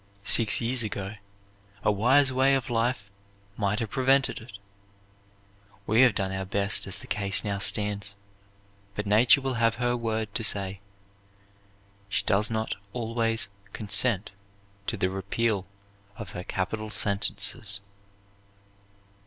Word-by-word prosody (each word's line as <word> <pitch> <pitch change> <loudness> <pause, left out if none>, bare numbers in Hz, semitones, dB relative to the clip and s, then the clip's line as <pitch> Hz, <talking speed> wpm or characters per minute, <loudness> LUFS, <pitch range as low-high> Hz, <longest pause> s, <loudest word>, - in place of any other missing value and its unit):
Six 115 -3 +6
years 120 +2 +2
ago 100 -2 -3 0.7
a - - +3
wise 130 +6 +3
way 135 +1 +3
of 135 -1 -3
life 115 -3 -1 0.4
might 105 -1 -1
have 110 -3 -4
prevented 135 +1 +2
it. 115 -3 -12 1.3
We 110 +3 +3
have 125 -6 +5
done 95 -1 -1
our 95 0 -3
best 100 +2 -1
as 95 0 -1
the - - -11
case 100 -2 -1
now 100 -2 -2
stands, 100 -1 +1 0.8
but 105 - -3
Nature 115 +7 +5
will 135 -1 -1
have 115 0 +3
her 120 +1 0
word 110 -3 -3
to 115 - 0
say. 100 -2 +1 1.3
She 100 0 -1
does 105 +2 +2
not 110 -1 -2 0.2
always 115 -4 -1 0.2
consent 105 0 +2 0.6
to - - -2
the 95 - 0
repeal 100 +1 -1 0.5
of 110 -6 -8
her 90 - -6
capital 110 +3 -3
sentences." 100 0 +1
110 Hz, 130 wpm, -27 LUFS, 100-115 Hz, 1.3 s, Six